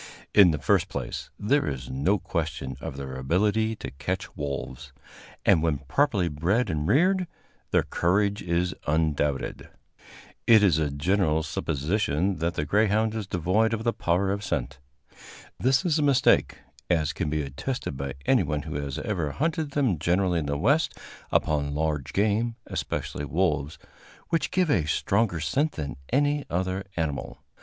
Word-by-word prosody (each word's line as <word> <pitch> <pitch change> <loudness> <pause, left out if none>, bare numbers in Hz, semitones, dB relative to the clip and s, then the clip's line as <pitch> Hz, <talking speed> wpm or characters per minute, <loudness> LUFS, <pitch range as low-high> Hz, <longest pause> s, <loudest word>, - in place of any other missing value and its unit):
In 100 -4 +8
the 80 - 0
first 70 - +2
place, - - -5
there 140 +8 +1
is 65 -3 -4
no 75 +11 +2
question 75 -8 -3
of 65 - -6
their 70 -1 -6
ability 105 +11 +1
to - - -7
catch 90 +8 -4
wolves, 70 0 -5 0.5
and, 80 - +5
when 80 -3 +1
properly 95 - +1
bred 85 +11 0
and 75 -1 -2
reared, 185 +5 +3 0.4
their - - +3
courage 100 +4 +1
is 90 +1 0
undoubted. 75 -2 0 0.8
It 110 -2 +7
is 85 -6 +4
a 75 -2 +1
general 80 +2 +1
supposition 80 +4 -1
that 85 +2 -1
the 75 - -1
greyhound 110 +3 +2
is 110 -3 -4
devoid 95 +6 +1
of 110 - -6
the 115 0 +1
power 90 +3 +1
of 100 +1 -3
scent. 70 -6 -3 0.8
This 130 +4 +2
is 160 -3 +2
a - - +2
mistake, 140 -3 +3 0.3
as 80 -4 +1
can 80 -2 -2
be 75 0 -1
attested 70 - -4
by 70 0 -4
anyone 75 -1 +2
who 80 - -6
has 70 -2 -4
ever 90 -8 -2
hunted 160 0 -1
them 125 - +1
generally 90 +2 +1
in 75 - -3
the 70 0 -1
West 140 - +2 0.3
upon 70 -1 +1
large 75 -3 -1
game, 110 +4 +1
especially 70 - -4
wolves, 75 -2 0 0.5
which 160 -3 +1
give 180 -4 +1
a 80 - +2
stronger 95 +3 +1
scent 135 - 0
than 75 -3 -5 0.2
any 145 +2 +2
other 95 +2 -2
animal. 80 -4 -3
85 Hz, 155 wpm, -26 LUFS, 75-110 Hz, 0.8 s, In